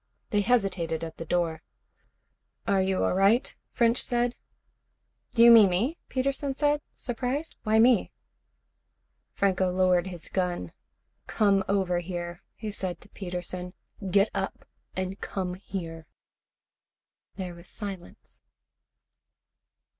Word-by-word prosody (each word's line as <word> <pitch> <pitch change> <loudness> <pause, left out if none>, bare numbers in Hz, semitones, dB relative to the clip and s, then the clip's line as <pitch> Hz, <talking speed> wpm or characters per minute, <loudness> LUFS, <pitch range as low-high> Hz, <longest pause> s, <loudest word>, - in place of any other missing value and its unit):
They 205 -2 +3
hesitated 190 -8 +1
at 165 -1 -6
the 165 - -6
door. 165 -1 0 1.1
"Are 195 -1 +3
you 190 0 +1
all - - +2
right?" 205 +8 +3
French 235 0 +2
said. 240 -1 +1 0.9
"Do 230 - +4
you 235 - +10
mean 220 -4 +9
me?" 230 - 0
Peterson 275 +1 -1
said, 295 +1 +2
surprised. 260 +5 -3
"Why 215 +1 +2
me?" 235 -2 +5 1.2
Franco 190 -2 +2
lowered 180 0 +3
his 175 -3 -8
gun. 175 - -2 0.6
"Come 200 -2 +3
over 190 -3 +1
here," 175 0 -5
he 215 -1 -5
said 185 -3 -4
to 205 - -14
Peterson. 180 -1 -5 0.3
"Get 200 +3 +4
up 195 0 -3 0.3
and 185 +1 -3
come 185 -2 -3
here." 165 -4 -6 1.3
There 185 -2 -5
was 170 +1 -12
silence. 195 -4 -8
190 Hz, 115 wpm, -28 LUFS, 180-230 Hz, 1.3 s, you